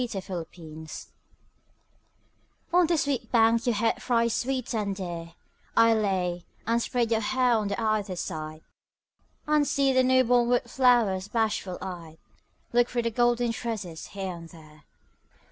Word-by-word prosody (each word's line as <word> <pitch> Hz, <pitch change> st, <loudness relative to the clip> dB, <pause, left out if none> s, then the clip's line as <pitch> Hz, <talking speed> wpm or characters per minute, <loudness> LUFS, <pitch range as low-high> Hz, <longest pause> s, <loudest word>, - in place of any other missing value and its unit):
YOUTH'S 235 Hz, -, -4 dB
SPRING 175 Hz, -3 st, -5 dB
TRIBUTE 160 Hz, -2 st, -9 dB, 1.7 s
On 355 Hz, -1 st, +5 dB
this 335 Hz, -2 st, +2 dB
sweet 265 Hz, -5 st, -2 dB
bank 230 Hz, 0 st, +3 dB
your 240 Hz, -, +2 dB
head 225 Hz, +1 st, 0 dB
thrice 235 Hz, -2 st, +1 dB
sweet 255 Hz, 0 st, -2 dB
and 205 Hz, -3 st, -1 dB
dear 170 Hz, -3 st, -6 dB, 0.4 s
I 230 Hz, 0 st, +6 dB
lay, 185 Hz, -5 st, 0 dB, 0.2 s
and 230 Hz, +1 st, +1 dB
spread 235 Hz, -1 st, -1 dB
your 225 Hz, -, +3 dB
hair 255 Hz, +2 st, +2 dB
on 210 Hz, -3 st, 0 dB
either 215 Hz, -3 st, -1 dB
side, 155 Hz, -2 st, -5 dB, 0.8 s
And 300 Hz, -1 st, +2 dB
see 275 Hz, -1 st, +2 dB
the 260 Hz, -, +5 dB
newborn 250 Hz, -2 st, +3 dB
wood 245 Hz, 0 st, +3 dB
flowers 235 Hz, -7 st, +2 dB
bashful 215 Hz, -4 st, -1 dB
eyed 170 Hz, -4 st, -7 dB, 0.6 s
Look 240 Hz, 0 st, +3 dB
through 240 Hz, -1 st, -1 dB
the 230 Hz, -, -1 dB
golden 240 Hz, 0 st, +2 dB
tresses 210 Hz, -8 st, -5 dB
here 190 Hz, -2 st, -5 dB
and 165 Hz, -1 st, -11 dB
there. 155 Hz, -3 st, -16 dB
225 Hz, 145 wpm, -27 LUFS, 185-245 Hz, 1.7 s, I